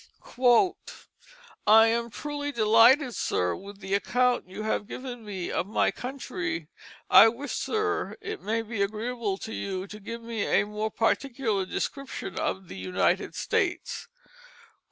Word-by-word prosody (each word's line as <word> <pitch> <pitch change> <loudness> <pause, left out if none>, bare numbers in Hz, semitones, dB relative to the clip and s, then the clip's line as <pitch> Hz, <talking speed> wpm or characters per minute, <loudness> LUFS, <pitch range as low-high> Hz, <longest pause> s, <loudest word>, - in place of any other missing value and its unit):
"I 220 +1 +8
am 235 +1 0
truly 290 +3 -4
delighted, 235 +3 +5
sir, 90 - 0
with 200 +1 -11
the 190 +1 -4
account 245 +1 +1
you 200 +3 -6
have 215 -1 -1
given 245 -2 -7
me 195 -4 -5
of 180 - -1
my 215 - +2
country. 265 - -5 0.4
I - - +9
wish, 240 +5 -3
sir, 430 -2 -1
it 430 -1 -6
may 225 +1 -1
be 220 -2 -4
agreeable 215 0 -2
to 220 - -7
you 190 -1 -3
to 210 +1 -10
give 230 +3 -7
me 230 -2 -4
a - - +2
more 210 +1 -3
particular 225 -3 0
description 275 +6 -4
of 190 -1 -2
the - - -9
United 180 0 0
States. - - -1
225 Hz, 140 wpm, -27 LUFS, 200-250 Hz, 0.4 s, I